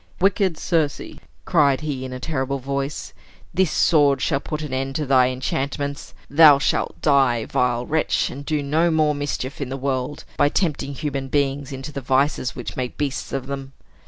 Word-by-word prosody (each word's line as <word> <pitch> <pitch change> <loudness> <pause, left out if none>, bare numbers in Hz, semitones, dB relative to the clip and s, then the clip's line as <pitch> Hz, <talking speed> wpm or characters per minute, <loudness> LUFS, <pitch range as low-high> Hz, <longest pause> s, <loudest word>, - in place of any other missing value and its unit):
"Wicked 190 -2 +2
Circe," 160 -5 0 0.5
cried 140 -1 +3
he, 145 -4 -3
in 130 - -6
a 130 - -6
terrible 140 -2 -2
voice, 140 +2 -4 0.4
"this 190 -2 +2
sword 145 -4 +3
shall 135 -4 0
put 155 +2 -5
an 145 -3 -5
end 135 +1 -2
to 150 -1 -1
thy 130 -2 +4
enchantments. 140 +2 -3
Thou 150 0 +7
shalt 140 - -1
die, 135 -6 +3
vile 125 -1 0
wretch, 155 +3 0
and 140 +2 -8
do 150 0 -1
no 160 +5 +2
more 155 -2 +2
mischief 145 -1 -4
in 135 - -3
the 135 - -4
world, 135 +1 -2
by 145 - +4
tempting 145 -5 -1
human 140 -2 -3
beings 140 0 -1
into 135 +2 -6
the 140 - -5
vices 130 0 +1
which 125 - -6
make 125 -1 -4
beasts 145 -2 -3
of 135 -2 -3
them." 135 0 -6
140 Hz, 180 wpm, -22 LUFS, 135-150 Hz, 0.5 s, Thou